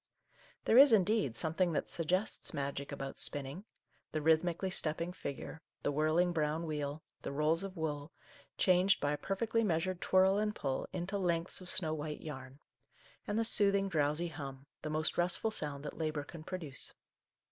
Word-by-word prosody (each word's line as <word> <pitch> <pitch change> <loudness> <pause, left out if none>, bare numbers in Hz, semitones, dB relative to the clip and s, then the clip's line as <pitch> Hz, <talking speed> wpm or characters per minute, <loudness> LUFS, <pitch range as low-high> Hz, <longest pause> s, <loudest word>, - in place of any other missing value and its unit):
There 235 - +7
is, 280 -1 +9
indeed, 205 - +3
something 170 +2 +1
that - - -1
suggests 185 +5 -1
magic 140 0 -3
about 135 -1 -5
spinning, 145 +7 -3 0.2
— - - -40
the 155 - 0
rhythmi 160 +2 +3
cally 190 -1 -2
stepping 170 +1 +1
figure, 150 0 -6 0.2
the - - +1
whirling 155 +4 +2
brown 155 +1 0
wheel, 150 -1 -3 0.2
the - - -4
rolls 150 +3 +2
of 195 -2 -6
wool, 150 -2 -3 0.5
changed 185 +1 +4
by 145 - 0
a 150 - 0
perfectly 230 +6 0
meas 165 -6 +1
ured 185 -2 -2
twirl 190 +2 +4
and 210 0 0
pull 135 -2 -2
into 185 +2 -2
lengths 170 -1 0
of 185 - -7
snow 160 -5 +1
white 150 -1 -4
yarn, 135 -2 -8 0.7
and 205 - -1
the 225 - +2
soothing, 200 -3 +3
drowsy 155 +1 +1
hum, 135 -3 -7 0.2
the 155 - -4
most 155 +2 0
restful 180 +5 +1
sound 145 -7 -2
that 150 - -6
labour 155 -2 -1
can 155 +2 -10
pro 185 +3 -4
duce. 150 -6 -5
160 Hz, 180 wpm, -34 LUFS, 150-185 Hz, 0.7 s, is